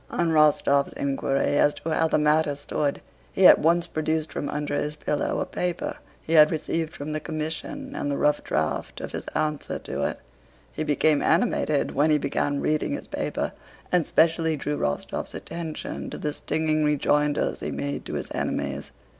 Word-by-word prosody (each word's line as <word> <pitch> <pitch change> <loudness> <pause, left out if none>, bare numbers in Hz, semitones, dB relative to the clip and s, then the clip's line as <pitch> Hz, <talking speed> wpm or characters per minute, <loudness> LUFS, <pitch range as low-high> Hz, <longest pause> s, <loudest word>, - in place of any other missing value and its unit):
On 170 -1 0
Rostóv's 150 -2 +3
inquiry 135 0 0
as 145 - +4
to 165 - -5
how 160 +1 +3
the - - +2
matter 150 0 +3
stood, 145 0 -2 0.3
he 190 - +3
at - - +9
once 170 +2 +3
produced 155 -1 -2
from 145 - -3
under 150 0 -3
his 150 +1 -2
pillow 150 -1 -1
a - - 0
paper 180 -1 -3 0.3
he 160 - -3
had 155 -1 +8
received 160 0 -2
from 145 +2 -5
the 155 - -1
commission 165 - -5
and 145 - -2
the 140 - -1
rough 150 0 +2
draft 75 0 -2
of - - -6
his - - -6
answer 150 -1 -1
to - - -5
it. - - -3 0.5
He 155 - -2
became 150 0 +2
animated 160 -5 +1
when 150 +3 +3
he 150 - +5
began 145 0 -1
reading 155 - 0
his 285 - -5
paper - - -2 0.4
and 180 -3 +2
specially 160 -1 +3
drew 150 +1 -2
Rostóv's 70 0 -3
attention 165 -2 -5
to - - -6
the 150 -1 -2
stinging 155 0 0
rejoinders 150 0 +1
he - - -4
made 140 0 -3
to - - -5
his - - -4
enemies. 70 0 -2
150 Hz, 180 wpm, -25 LUFS, 145-160 Hz, 0.5 s, at